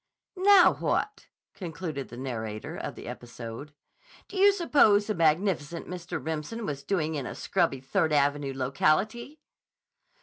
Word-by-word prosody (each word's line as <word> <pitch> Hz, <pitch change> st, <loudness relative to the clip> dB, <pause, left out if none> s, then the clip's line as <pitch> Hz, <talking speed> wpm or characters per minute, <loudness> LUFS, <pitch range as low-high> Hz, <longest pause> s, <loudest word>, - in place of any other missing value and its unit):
"Now, 385 Hz, 0 st, +6 dB
what," 420 Hz, 0 st, -1 dB, 0.3 s
concluded 165 Hz, -6 st, -6 dB
the 120 Hz, -, -10 dB
narrator 110 Hz, -5 st, -5 dB
of -, -, -5 dB
the -, -, -10 dB
episode, 120 Hz, +3 st, -8 dB, 0.6 s
"do -, -, -12 dB
you 400 Hz, +1 st, +6 dB
suppose 285 Hz, -, +4 dB
the 215 Hz, -, -1 dB
magnificent 170 Hz, -1 st, 0 dB
Mr. 180 Hz, -1 st, -5 dB
Remsen 160 Hz, +9 st, -4 dB
was 140 Hz, -6 st, -4 dB
doing 160 Hz, 0 st, -1 dB
in 140 Hz, -4 st, -3 dB
a -, -, -6 dB
scrubby 170 Hz, -8 st, 0 dB
Third 155 Hz, +4 st, 0 dB
Avenue 145 Hz, -1 st, +1 dB
locality?" 205 Hz, -, 0 dB
160 Hz, 135 wpm, -28 LUFS, 140-210 Hz, 0.6 s, Now